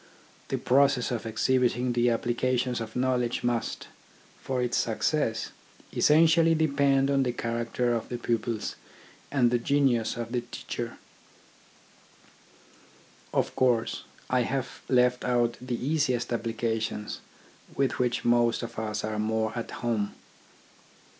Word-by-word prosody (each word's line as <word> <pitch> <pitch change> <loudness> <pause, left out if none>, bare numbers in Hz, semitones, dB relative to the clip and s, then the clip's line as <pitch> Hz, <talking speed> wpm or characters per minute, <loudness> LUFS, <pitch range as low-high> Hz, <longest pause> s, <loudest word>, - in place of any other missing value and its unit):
The - - -1
process 135 -1 +3
of 115 -2 -3
exhibiting 125 +1 +1
the 120 0 +2
applica 120 +2 +1
tions 125 -1 -1
of 110 -1 -7
knowledge 125 -1 0
must, 120 -1 -1 0.5
for 130 -1 -2
its 125 -1 0
success, 115 0 0 0.4
essen 155 +2 +5
tially 165 0 +4
depend 140 -3 +2
on 140 -1 +3
the 125 -2 +1
character 120 +1 -1
of 115 - -3
the 120 - -3
pupils 115 -2 -2 0.5
and 125 -4 +3
the 120 - +2
genius 125 -4 +1
of 115 -1 -4
the 125 -1 0
teacher. 120 - -6 2.3
Of - - 0
course 120 -3 +1 0.2
I 125 -1 +2
have 130 +2 -3
left 125 -1 +3
out 120 -1 +1
the 125 -1 -3
easiest 130 -5 0
applications 110 -2 -2 0.6
with 135 -1 0
which 125 -1 0
most 120 0 +3
of 115 -1 -6
us 110 -1 -3
are 110 0 -2
more 110 0 0
at 115 - -4
home. 110 -4 -2
120 Hz, 130 wpm, -28 LUFS, 115-130 Hz, 2.3 s, essen